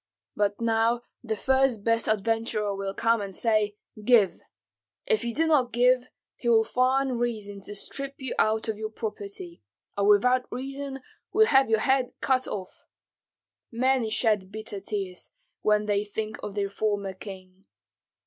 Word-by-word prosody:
But 205 -1 0
now 230 +1 +1 0.2
the 220 -2 -2
first 265 -2 +2
best 230 -1 +2
adventurer 215 -1 0
will 195 0 -4
come 230 -1 +2
and 195 -2 -5
say, 215 -2 +1 0.3
'Give.' 215 -5 +4 0.6
If 455 -3 +1
you 235 - -1
do 320 +7 +1
not 280 -7 +3
give, 250 +1 +3 0.3
he 240 - -2
will 225 -1 +5
find 255 +1 +1
reason 210 -4 -3
to 205 +1 -8
strip 275 +6 -5
you 265 -2 -4
of 220 0 +2
your 215 0 -3
property, 200 - -7 0.3
or 200 0 +1
without 250 +5 +4
reason 270 +1 -5 0.3
will 440 +1 +5
have 270 - +4
your 220 -1 +3
head 265 0 +2
cut 260 -1 +1
off. 190 -3 -6 0.9
Many 250 -1 +1
shed 210 -4 +1
bitter 215 -1 -5
tears, 195 -2 -4 0.3
when 210 0 +2
they 205 -1 +1
think 215 +1 -5
of 205 - -6
their 200 -1 -1
former 200 -2 -1
king. 190 0 -11
220 Hz, 150 wpm, -27 LUFS, 205-250 Hz, 0.9 s, will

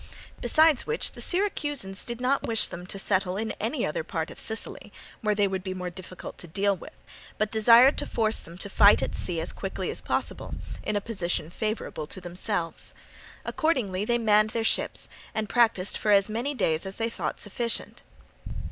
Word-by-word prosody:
Besides 315 -4 +4
which 460 +1 +1
the - - -9
Syracusans 290 - 0
did 235 -1 -5
not 255 +2 +2
wish 225 -1 +3
them 180 +1 -7
to 195 - -3
settle 190 -1 0
in 220 +1 -1
any 235 +4 0
other 155 - -2
part 160 0 -3
of - - -8
Sicily, 220 0 -4 0.3
where 210 -2 +1
they 205 -1 +3
would 190 -1 -2
be 185 -1 -4
more 180 -1 -4
difficult 185 0 -9
to 175 - -7
deal 200 +4 +1
with, 180 - -12 0.4
but 215 0 0
desired 230 +5 +7
to - - -2
force 220 -1 +1
them 170 +1 -11
to 195 - -4
fight 200 +1 +6
at - - -2
sea 170 -2 -1
as 160 - -3
quickly - - -3
as - - -3
possible, - - -2 0.3
in 215 - -2
a 205 - +1
position 175 -7 -2
favourable 215 -7 -3
to - - -6
themselves. 175 -1 -3 0.5
Accordingly 230 - 0
they 240 +3 +2
manned 215 -2 +4
their 225 0 -1
ships - - +1 0.3
and 220 -1 -1
practised 225 -5 +2
for 215 - -1
as 200 0 +5
many 250 +6 -2
days 160 -6 0
as 190 - -6
they 230 0 -1
thought - - -3
sufficient. 230 +3 -3
210 Hz, 190 wpm, -27 LUFS, 185-230 Hz, 0.5 s, desired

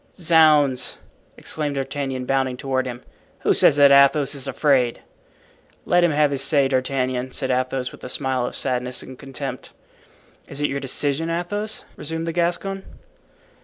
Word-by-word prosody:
"Zounds!" 155 -6 +3 0.4
exclaimed 150 -2 -2
D'Artagnan, 135 -1 -3
bounding 130 -1 0
toward 130 -1 -1
him, 120 0 -7 0.4
"who - - +3
says - - +5
that 140 -1 +6
Athos 140 +1 +5
is 140 -1 -6
afraid?" 135 -3 +1 0.8
"Let 175 0 +3
him 175 - +4
have 150 -1 +2
his 140 -1 -1
say, 140 -1 +3
D'Artagnan," 130 -1 -1
said 130 -2 -2
Athos, 130 0 -1
with - - -15
a 130 - -6
smile 130 -2 -1
of - - -6
sadness 125 0 -2
and 130 -1 -11
contempt. 135 -1 -7 0.7
"Is - - -8
it 145 - 0
your 140 - -2
decision, 140 +3 -2
Athos?" 205 +6 -3
resumed 165 +2 -5
the 165 - -2
Gascon. 175 +3 -1
140 Hz, 155 wpm, -22 LUFS, 130-155 Hz, 0.8 s, that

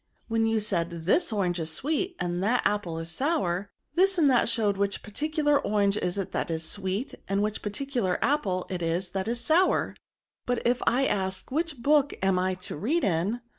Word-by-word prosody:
When 225 -1 +1
you 225 0 +2
said 170 -5 -1 0.2
this 330 - +3
orange 185 -4 0
is 160 -1 -1
sweet, 320 - -1
and 175 0 -1
that 225 +6 +2
apple 205 -6 0
is 165 +1 -5
sour, 200 - 0 0.2
this 380 +1 +3
and 295 -5 +5
that 245 - +3
show 220 -3 +2
which 200 0 -2
particular 295 +5 +1
orange 200 -1 +1
it - - -3
is 180 - 0
that 195 -3 -2
is 160 -1 -2
sweet, 200 +4 -2
and 195 +1 +1
which 215 0 -2
particular 210 -3 -1
apple 195 -11 0
it 180 -2 -3
is 170 +2 -1
that 190 +1 -2
is 235 +1 -1
sour; 320 +9 +2 0.5
but 245 -1 +1
if 245 +1 +2
I 265 +3 +3
ask 190 -3 -2
which 315 +1 -1
book 290 -1 +3
I - - +3
am 185 0 +1
to 185 - -6
read 285 - 0
in? 195 +7 0
210 Hz, 195 wpm, -27 LUFS, 185-275 Hz, 0.5 s, and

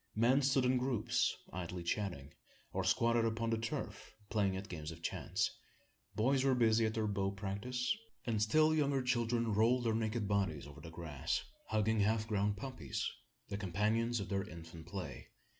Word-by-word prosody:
Men 120 +6 +4
stood 135 -1 +3
in 125 0 +3
groups, 125 -4 +1 0.2
idly 90 0 -4
chatting, 85 -7 -2 0.4
or - - 0
squatted 115 0 +3
upon 115 0 0
the 115 - +2
turf, 115 -1 -4 0.2
playing 100 -4 +2
at 95 +1 -6
games 75 -4 -5
of 85 0 -9
chance. - - 0 0.6
Boys 130 +4 +3
were 135 -1 +4
busy 115 -2 +4
at 110 - -3
their 110 -1 +1
bow 100 -2 0
practice; 105 +6 -2 0.3
and 110 -3 0
still 155 +9 +4
younger 140 -3 +2
children 120 -2 +1
rolled 120 +4 +4
their 115 -2 +2
naked 110 -1 0
bodies 95 -9 0
over 75 0 -11
the 85 - -8
grass, 80 -2 -2 0.2
hugging 110 +1 +2
half 110 +2 +2
grown 105 -1 +1
puppies 100 - -3 0.4
the 100 - -2
companions 110 +5 +1
of 100 - -4
their 100 +1 -1
infant 85 -1 -10
play. 85 -8 -6
110 Hz, 170 wpm, -36 LUFS, 95-120 Hz, 0.6 s, Men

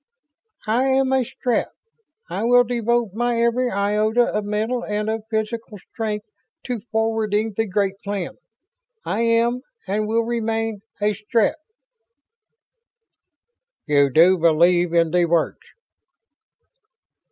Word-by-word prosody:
"I 235 +4 +1
am 265 0 +2
a 265 -1 +3
Strett. 245 +1 -1 0.6
I - - -4
will 245 +1 +5
devote 235 -3 0
my 240 +1 0
every 235 +2 +1
iota 210 +3 +1
of 210 -3 -2
mental 220 +4 -1
and 210 0 -2
of 220 -1 -4
physical 220 0 -3
strength 210 +1 -5 0.4
to 245 -3 -3
forwarding 220 -1 0
the 225 +1 0
Great 195 0 -1
Plan. 200 -3 -3 0.7
I 215 - -1
am, 235 +2 +2 0.2
and 210 +2 -1
will 230 +1 +1
remain, 225 -2 -2 0.2
a 210 0 +1
Strett." 215 +2 0 2.3
"You 145 -2 +3
do 170 +6 +5
believe 170 +2 +3
in 165 -1 +2
The 175 0 +3
Words." 170 -1 0
220 Hz, 120 wpm, -22 LUFS, 200-235 Hz, 2.3 s, will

